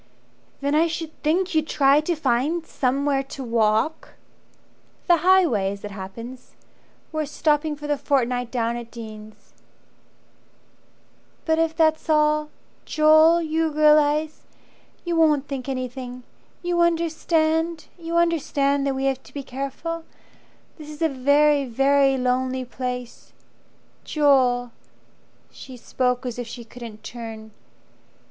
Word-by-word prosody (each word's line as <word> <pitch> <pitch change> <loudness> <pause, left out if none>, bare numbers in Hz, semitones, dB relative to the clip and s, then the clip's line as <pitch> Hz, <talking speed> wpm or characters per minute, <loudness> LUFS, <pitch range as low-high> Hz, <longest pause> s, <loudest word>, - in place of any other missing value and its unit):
"Then 285 +1 0
I 320 +3 +4
should 325 -1 -5
think 350 +5 0
you'd 315 -1 +1
try 280 0 +4
to 340 +3 -1
find 295 +4 0
Somewhere 275 +1 0
to 270 0 -8
walk 230 +5 0 0.4
" - - -36
"The 345 -2 +5
highway 320 - +3
as 200 - -11
it 205 - -7
happens 230 +6 -9 0.6
We're 310 -2 -2
stopping 300 0 0
for 295 0 -10
the 295 -1 -1
fortnight 250 -3 0
down 235 -1 -1
at 235 -1 -8
Dean's." 215 -2 -11 1.9
"But 320 0 +1
if 325 -1 +1
that's 315 0 +1
all 300 0 +2 0.3
Joel 315 +2 +5
you 320 0 0
realize 305 0 +2 0.6
You 345 -1 -1
won't 300 -3 +3
think 275 -1 -5
anything. 255 -1 -5 0.4
You 350 0 +1
understand? 325 -1 +1
You 335 -1 -3
understand 285 -4 +1
that 270 - 0
we 265 +1 -2
have 265 -1 0
to - - -18
be 280 - -4
careful. 275 +6 -5 0.8
This 305 -1 -10
is 305 +2 -5
a 320 - +3
very, 285 +2 +3
very 270 +2 +3
lonely 255 0 -1
place. 250 -1 -6 0.7
Joel!" 255 -5 +2 0.8
She 260 -2 -11
spoke 250 +1 -1
as 245 -1 -4
if 245 - -5
she 235 +1 -8
couldn't 230 -2 -11
turn. 225 -2 -8
280 Hz, 130 wpm, -23 LUFS, 250-315 Hz, 1.9 s, The